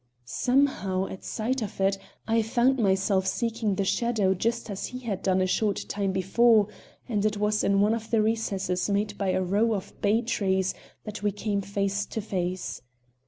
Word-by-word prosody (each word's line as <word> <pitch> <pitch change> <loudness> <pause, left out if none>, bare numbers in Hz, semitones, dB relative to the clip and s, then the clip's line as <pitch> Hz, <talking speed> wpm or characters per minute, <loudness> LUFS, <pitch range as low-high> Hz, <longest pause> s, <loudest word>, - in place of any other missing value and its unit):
Somehow, 225 - +1
at 190 - -8
sight 250 +4 -2
of 205 -3 -5
it, 195 +1 +3 0.3
I 225 0 +3
found 240 +4 +2
myself 190 -2 +2
seeking 230 -1 0
the 195 - 0
shadow 220 -3 +1
just 230 +4 -2
as 195 - -4
he 250 - -7
had 220 -7 -4
done 190 -1 +2
a - - +3
short 200 +2 0
time 200 -1 -1
before, 210 +3 +4 0.4
and 210 -5 0
it 215 -1 +1
was 210 +1 +1
in 200 0 +3
one 210 +2 +3
of 225 -1 -4
the 225 -1 +3
recesses 200 -4 -1
made 205 +1 0
by 195 -2 0
a 185 0 +1
row 210 +5 +2
of 195 - -6
bay 215 +3 +2
trees 190 -5 0 0.3
that 210 -1 -7
we 205 0 +1
came 205 0 -2
face 200 +1 -1
to - - -4
face. 185 -3 -3
205 Hz, 185 wpm, -27 LUFS, 190-225 Hz, 0.4 s, before